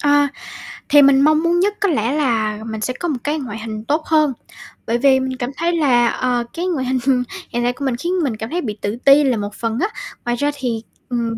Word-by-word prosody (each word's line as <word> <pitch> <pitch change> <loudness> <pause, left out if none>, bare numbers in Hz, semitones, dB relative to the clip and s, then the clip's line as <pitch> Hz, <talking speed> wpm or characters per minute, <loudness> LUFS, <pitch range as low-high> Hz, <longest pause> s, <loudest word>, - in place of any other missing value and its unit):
Ờ, 290 0 +4 0.6
thì 290 0 +7
mình 275 0 +6
mong 310 +2 +4
muốn 340 +1 +2
nhất 400 +3 +2
có 405 -2 +2
lẽ 230 -5 0
là 225 -8 0
mình 220 -1 -5
sẽ 255 - -1
có 350 - -2
một 290 -6 -1
cái 300 +1 -1
ngoại 225 -5 -6
hình 215 -1 -6
tốt 310 +2 0
hơn, 305 -4 +3 0.5
bởi 235 +1 +1
vì 265 +1 +4
mình 260 0 -3
cảm 245 -1 -3
thấy 335 +2 +1
là, 245 -6 +3
ờ, 245 0 0
cái 345 +2 -3
ngoại 305 -8 -1
hình 255 0 +1 0.3
hiện 240 0 -2
tại 245 +1 +1
của 280 - -5
mình 260 -3 0
khiến 340 +9 -2
mình 245 -7 -1
cảm 220 +1 -5
thấy 350 +4 -2
bị 215 -6 -4
tự 205 +2 -2
ti 280 +2 +7
là 260 -4 +1
một 205 0 -4
phần 230 +1 -2
á. 400 - +2 0.4
Ngoài 240 - 0
ra 290 +4 0
thì, 240 -5 -3 0.3
ừm, 235 -2 -2
260 Hz, 250 wpm, -19 LUFS, 235-295 Hz, 0.6 s, thì